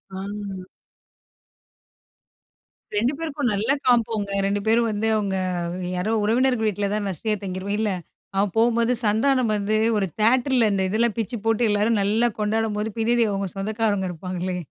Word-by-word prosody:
ஆ. - - -5 2.8
2 235 +7 +2
பேருக்கும் 300 -5 -2
நல்லா 210 +7 +1
காம்போங்க, 225 -4 +2 0.2
2 200 +1 0
பேரும் 230 +1 +3
வந்து 215 +1 -1
அவுங்க, 200 -3 -1 0.6
யாரோ 180 +5 -1
உறவினர்கள் 235 +1 +2
வீட்ல 205 -1 -1
தான் 210 -1 -1
நஸ்ரியா 210 +4 -2
தங்கிருக்கும் 190 +2 -3
இல்ல. 215 -2 +1 0.4
அவன் 195 -1 +1
போம்போது 235 +1 +3
சந்தானம் 230 +3 +2
வந்து 210 +1 0 0.2
ஒரு 195 -2 0
தியேட்டர்ல, 245 0 +3
இந்த 190 -1 +1
இதெல்லாம் 225 +2 +1
பிச்சு 230 +2 -2
போட்டு, 225 0 +2
எல்லாரும் 210 +1 +2
நல்லா 220 +4 +2
கொண்டாடம்போது, 215 0 -1
பின்னாடி 235 +1 +3
அவுங்க 195 -1 -2
சொந்தக்காரங்க 205 -1 0
இருப்பாங்களே! 180 +1 -4
215 Hz, 135 wpm, -23 LUFS, 200-235 Hz, 2.8 s, பேரும்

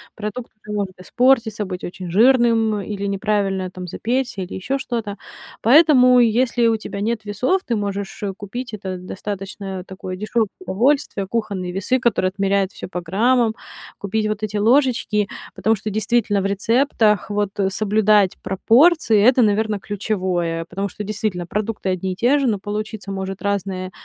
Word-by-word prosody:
продукт 215 +3 -6 0.2
может 200 -3 -3
испортиться, 230 +1 +2
быть 185 -2 -5
очень 180 -1 -7
жирным 225 -1 +4
или 200 0 -4
неправильно, 195 -2 -1
там, 180 -1 -8
запечься, 240 +3 -2
или 180 - -6
ещё 260 +9 -2
что-то. 230 -6 -4 0.5
Поэтому, 255 -1 +6
если 240 0 +3
у 225 - +3
тебя 215 -2 -6
нет 220 +1 -1
весов, 250 - 0
ты 235 - -1
можешь, 200 -1 -4
э, 200 -2 -2
купить- 225 +5 -7
это 190 -3 -5
достаточно 190 0 -6
такое 185 -1 -7
дешёвое 215 +1 0
удовольствие- 265 - 0
кухонные 200 -4 -3
весы, 200 +8 0
которые 230 -6 +1
отмеряют 195 -1 +1
всё - - -8
по 180 - -4
граммам, 225 +6 +2 0.4
купить 215 +2 -1
вот 215 0 -3
эти 210 0 -2
ложечки. 225 -3 +2 0.3
Потому 220 0 +1
что 215 - -5
действительно 210 0 +1
в - - -3
рецептах 215 +1 +2
вот, 205 -1 -2
э, 195 -1 +2 0.2
соблюдать 210 -3 +4
пропорции- 230 - +4
это, 250 +4 +5
наверно, 215 0 +1
ключевое, 185 -5 -2
потому 195 +4 -4
что 210 - -7
действительно 205 -3 -3
продукты 210 +1 -3
одни 185 0 -2
и - - -9
те 250 +9 +3
же, 275 - +1
но 215 -3 +1
получиться 210 +1 -5
может 190 0 -5
разные, 190 -2 -2
210 Hz, 155 wpm, -21 LUFS, 195-230 Hz, 0.5 s, Поэтому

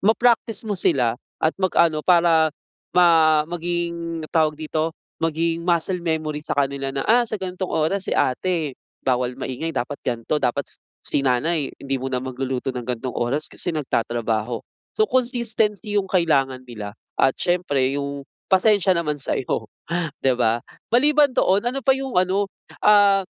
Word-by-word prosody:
Ma-practice 225 0 +2
mo 215 - -2
sila 130 -10 +2 0.2
at 160 - +2
mag-ano 170 -4 +3
para, 170 -2 +4 0.5
ma 160 -3 +5
maging 170 -1 -3
tawag 155 -2 +2
dito, 155 +1 -1 0.3
maging 165 +1 0
muscle 175 +1 +1
memory 155 -2 -2
sa 150 - -3
kanila 140 -1 0
na, 135 0 -3
"Ah, 240 +2 +5
sa 215 - -2
ganitong 185 -1 -4
oras 165 +5 0
si - - -1
ate, 155 +1 0 0.3
bawal 125 -1 +1
maingay, 135 +5 -3
dapat 145 -3 -3
ganito, 120 +5 -1
dapat 135 +3 0
si - - -9 0.2
si - - +2
nanay 140 +4 +1
hindi 135 0 -2
muna 130 -1 -2
magluluto 130 0 -3
ng 125 - -4
ganitong 125 +1 -3
oras 135 +6 -1
kasi - - -2
nagtatrabaho." 115 -4 -1 0.4
So, 435 - +4
consistency 235 - 0
'yong 195 -2 0
kailangan 135 -8 +1
nila 105 -3 -8 0.2
at 135 - +3
siyempre 145 -7 +1
'yong 140 0 -4 0.3
pasensiya 195 0 +4
naman 150 -3 -2
sa - - -1
'yo, 110 -3 -3 0.5
'di 130 -1 +3
ba? 115 -1 +2 0.3
Maliban 290 +4 +4
doon, 195 +2 +3
ano 270 - -4
pa 265 - +6
'yong 265 -7 -1
ano, 195 +2 +1 0.3
ah, 205 -2 +6
160 Hz, 150 wpm, -22 LUFS, 135-185 Hz, 0.5 s, pa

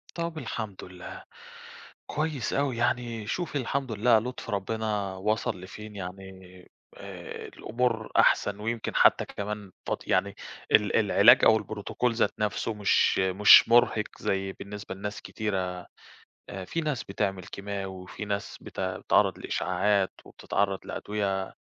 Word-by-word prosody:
طب 170 -1 -3
الحمد 110 -9 -5
لله، 90 -1 -10 0.8
كويس 150 -6 -2
أوي 140 -3 0
يعني، 120 -2 -1
شوفي 170 - -2
الحمد 130 -1 -2
لله 110 +2 +4
لطف 125 +3 -5
ربنا 105 -1 -2
وصل 105 +1 -1
لفين، 105 +3 -10
يعني 95 0 -6 0.7
آآ، - - -8
الأمور 115 -1 -2
أحسن، 100 0 +3
ويمكن 115 +1 -3
حتى - - +5
كمان 105 -1 -6
فد - - 0
يعني - - +1 0.4
ال - - +4
العلاج - - +6
أو 110 - +6
الprotocol 110 +3 -2
ذات 110 -2 +2
نَفسه 105 +1 -1
مش 105 -1 +3
مش 95 +4 +7
مرهق 115 -2 +4 0.2
زي 95 0 -1
بالنسبة 100 0 -8
لناس 105 +1 -6
كتيرة، 95 -4 -3 0.6
آآ، 95 -1 -6
في 165 - -2
ناس 150 -7 -2
بتعمل 95 -1 -2
كيماوي 100 +1 -5 0.2
وفي 90 +3 -7
ناس 100 -1 -4
بت - - -8
بتتعرّض - - +1
لإشعاعات 95 +2 0
وبتتعرض 100 -1 -2
لأدوية 100 -2 -3
105 Hz, 130 wpm, -28 LUFS, 95-115 Hz, 0.8 s, مش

